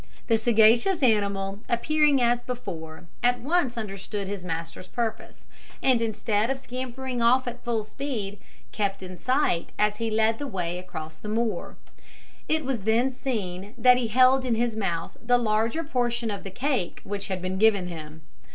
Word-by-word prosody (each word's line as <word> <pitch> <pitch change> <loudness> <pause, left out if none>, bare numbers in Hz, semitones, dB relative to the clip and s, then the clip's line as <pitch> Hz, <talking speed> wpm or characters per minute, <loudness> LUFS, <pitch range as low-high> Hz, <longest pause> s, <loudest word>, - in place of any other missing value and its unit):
The 225 -2 +2
sagacious 230 - +4
animal 200 -4 +1
appearing 300 +3 +3
as 240 0 +3
before, 175 -11 -6 0.2
at 245 0 +3
once 280 -3 0
understood 200 -1 -4
his 200 -2 -4
master's 165 +1 -5
purpose, 225 0 -4 0.4
and 255 -3 +4
instead 220 0 0
of 270 - 0
scampering 255 -1 -4
off 250 +2 +4
at 245 0 -6
full 225 -3 -1
speed, 215 -5 -4 0.3
kept 200 -2 -1
in 185 -1 -8
sight 255 - +1
as 210 0 +2
he 230 0 -1
led 220 +1 +2
the 290 - -3
way 180 -6 -3
across 160 -3 -8
the 210 - -6
moor. 225 +1 -1 0.7
It 315 -2 +1
was 260 -3 -1
then 225 +6 +2
seen 210 -6 -4
that 250 +1 +6
he 245 -2 0
held 255 +3 +5
in 245 -3 +1
his 235 0 0
mouth 175 -6 -2
the 245 +1 +4
larger 225 +6 +1
portion 240 -5 -1
of 200 - -5
the 195 - -6
cake 245 - -2
which 200 0 -4
had 190 -1 -2
been 185 +1 -3
given 210 -4 +4
him. 160 -2 -8
225 Hz, 170 wpm, -26 LUFS, 195-250 Hz, 0.7 s, that